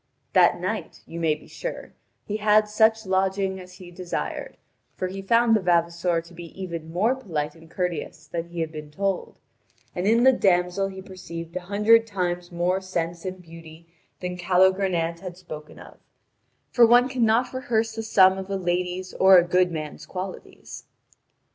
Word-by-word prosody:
That - - +5
night, - - -4
you 170 - -8
may 160 -2 +2
be 150 - -16
sure, - - -7 0.3
he 210 - -3
had 210 0 +4
such 220 +1 +3
lodging 190 0 0
as 180 0 -12
he 180 -1 -12
desired, 175 0 -5 0.4
for 185 - -2
he 195 +1 -6
found 230 +3 +3
the - - +3
vavasor 170 -1 +1
to 170 +1 -17
be 170 +2 -11
even 170 -4 -6
more 210 +9 +2
polite 165 - -4
and 165 -1 -17
courteous 170 -3 -4
than 165 +2 -5
he 170 -1 -4
had 160 -1 -3
been 150 -1 -8
told, 195 +4 -3 0.6
and 180 +1 -2
in 230 +2 +4
the 265 - +8
damsel 180 -2 +2
he 190 -1 -9
perceived 170 -3 -9
a - - -1
hundred 225 +3 +4
times 180 -3 -3
more 175 +2 0
sense 170 -2 -4
and 185 -1 -6
beauty 165 0 -13 0.3
than 180 0 -4
Calogrenant 180 -2 +2
had 180 -1 -8
spoken 155 -4 -10
of, - - -14 0.7
for 235 -2 +6
one 245 +2 +6
cannot 245 -1 +1
rehearse 225 -3 -1
the 225 - -4
sum 190 -3 +4
of 190 0 -7
a 195 - -1
lady's 180 0 -2
or 190 0 +7
a 175 - +6
good 180 +1 +2
man's 155 -1 -6
qualities. 185 0 -8
185 Hz, 175 wpm, -24 LUFS, 170-200 Hz, 0.7 s, the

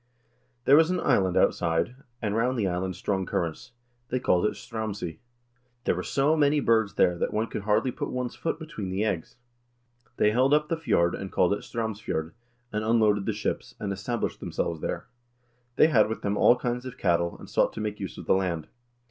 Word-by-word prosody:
" 125 0 -42
There 140 - +7
was 160 +1 +5
an 180 0 0
island 95 - +2
outside, 85 +8 +2 0.3
and 105 -1 0
round 125 +3 +1
the 105 -4 +1
island 90 +1 -2
strong 95 -2 -1
currents. 85 +7 -3 0.4
They 125 - 0
called 90 -5 +2
it - - -3
'Straumsey.' 105 -7 -5 0.6
There - - +2
were 90 - -3
so 140 +9 +2
many 145 -1 +3
birds 110 -6 +2
there 90 -1 +3
that - - 0
one 110 +1 +1
could 110 - -5
hardly 110 +4 +2
put - - -4
one's 125 -1 -3
foot 165 - -2
between 155 - -6
the 95 +3 -1
eggs. 95 -7 -2 0.8
They 105 - +4
held 130 +5 +4
up 150 0 0
the 165 - +1
fjord, 85 - +2
and 95 -1 -5
called 90 +2 +3
it 105 - -2
'Straumsfjord,' 105 -8 -3 0.4
and 105 0 -1
unloaded 110 -3 +3
the - - +2
ships, 105 - -3
and 100 -2 -2
established 105 +4 -3
themselves 80 -2 -3
there. - - -3 0.7
They - - +6
had 150 - +4
with 110 - -4
them 100 0 0
all 120 - +6
kinds 125 0 -3
of 125 - -8
cattle, 85 -2 +1
and - - -12
sought - - +2
to - - -6
make 105 -1 -3
use 95 -2 -6
of - - -8
the - - +4
land. 90 -4 -1
105 Hz, 205 wpm, -27 LUFS, 95-125 Hz, 0.8 s, There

